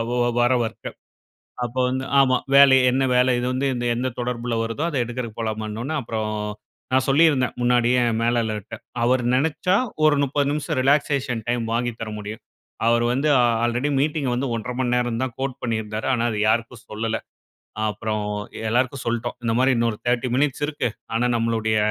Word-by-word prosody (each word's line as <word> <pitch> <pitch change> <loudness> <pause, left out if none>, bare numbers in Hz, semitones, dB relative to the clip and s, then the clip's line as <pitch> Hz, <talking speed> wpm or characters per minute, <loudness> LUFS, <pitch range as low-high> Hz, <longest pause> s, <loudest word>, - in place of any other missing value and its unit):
ஒ - - 0 0.2
வர 120 +1 +3
வொர்க்க. 110 - -6 0.8
அப்போ 120 +2 -3
வந்து 130 +1 -2 0.2
ஆமா. 130 -2 +4 0.2
வேலை 140 -1 +8
என்ன 130 +2 +1
வேலை 125 +1 +4
இது 120 - -1
வந்து 130 +2 -1 0.3
எந்த 125 +2 -1
தொடர்பில 120 -1 -2
வருதோ 115 +6 -3
அத 160 - -4
எடுக்குறதுக்கு 120 -2 -6
போலாமான்ன 110 -1 -3
ஒட்னே 155 +5 -3
அப்பறோம் 110 -2 -3 0.6
நான் 130 0 +3
சொல்லிருந்தேன் 140 -3 +3
முன்னாடியே 120 0 +3 0.2
மேலாளர்ட்ட. 115 -3 -1 0.3
அவர் 125 +1 +2
நெனைச்சா 160 +7 +1 0.3
ஒரு 155 -1 +5
30 140 +1 0
நிமிஷம் 145 0 -2
ரிலாக்சேஷன் 135 -3 +1
டைம் 120 -1 0
வாங்கி 120 +1 0
தர 115 - -4
முடியும். 105 +1 -7 0.4
அவர் 120 0 +3
வந்து 135 +5 0 0.4
ஆல்ரெடி 120 +4 0
மீட்டிங் 150 -1 0
வந்து 130 +3 -1
01:30 115 +2 -4
மணி 125 -2 0
நேரம் 120 -2 0
தான் 130 -3 -3
கோட் 135 -1 -3
பண்ணிருந்தாரு. 110 -2 -3
ஆனா 120 -2 +1
அதை 105 - -3
யாருக்கும் 115 +1 -1
சொல்லல. 110 +1 -2 0.7
அப்பறோம் 105 0 -3 0.4
எல்லாருக்கும் 125 +3 0
சொல்ட்டோம் 120 +1 -2
இந்த 115 -1 0
மாரி 130 +1 +4
இன்னொரு 115 -2 0
00:30 120 +1 +1
மினிட்ஸ் 145 +1 0
இருக்கு. 145 -5 -2 0.3
ஆனா 120 +2 +1
நம்மளுடைய 110 -1 0
120 Hz, 160 wpm, -23 LUFS, 115-130 Hz, 0.8 s, வேலை